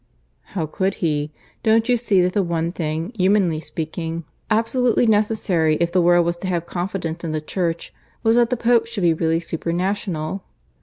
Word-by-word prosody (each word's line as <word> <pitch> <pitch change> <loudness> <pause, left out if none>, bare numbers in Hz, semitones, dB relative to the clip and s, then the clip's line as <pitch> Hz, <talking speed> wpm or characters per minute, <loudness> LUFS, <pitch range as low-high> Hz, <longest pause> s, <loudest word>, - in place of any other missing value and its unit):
"How 170 -5 0
could 190 +5 -1
he? 150 -3 -1 0.3
Don't 225 +1 +3
you 250 - +4
see 215 -6 +2
that 180 0 0
the 205 - +2
one 170 -2 -1
thing, 165 +4 -3
humanly 185 -4 +2
speaking, 165 +1 -4 0.3
absolutely 230 +2 +2
necessary 205 -7 +2
if 170 +1 0
the 185 - +3
world 175 0 +4
was 170 0 -1
to 185 - -5
have 175 -2 -1
confidence 175 -2 -4
in 160 -2 -3
the 155 - 0
Church, 170 +1 -3 0.3
was 225 0 +4
that 240 -1 +4
the 250 - 0
Pope 235 0 +3
should 230 -5 -4
be 170 -1 +5
really 160 +1 +1
supra 165 0 -4
national? 185 -1 -2
175 Hz, 185 wpm, -21 LUFS, 165-210 Hz, 0.3 s, be